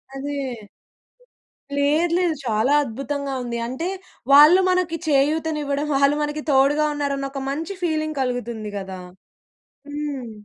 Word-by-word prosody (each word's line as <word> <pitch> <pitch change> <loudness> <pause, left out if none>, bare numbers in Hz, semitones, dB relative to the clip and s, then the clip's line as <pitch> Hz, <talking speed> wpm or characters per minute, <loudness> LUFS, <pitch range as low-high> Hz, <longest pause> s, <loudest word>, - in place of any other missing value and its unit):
అదే. 285 +1 -4 1.4
లేదు, 305 +4 +2
లేదు. 345 -3 +1
చాలా 225 +4 +2
అద్భుతంగా 275 +3 -4
ఉంది. 235 -1 -4
అంటే 260 +8 -3 0.4
వాళ్ళు 300 +6 +9
మనకు 365 -2 +1
చేయూతని 305 +2 +1
ఇవ్వడం. 285 +1 -1
వాళ్ళు 280 +1 +4
మనకు 295 +1 -3
తోడుగా 280 +3 +4
ఉన్నారు 285 -1 -1
అని 275 0 -3
ఒక 275 - -5
మంచి 320 +7 -3
ఫీలింగ్ 310 -2 -1
కలుగుతుంది 235 -4 -3
కదా. 190 -1 -6 0.9
హ్మ్. 290 -5 -4
285 Hz, 125 wpm, -22 LUFS, 265-305 Hz, 1.4 s, వాళ్ళు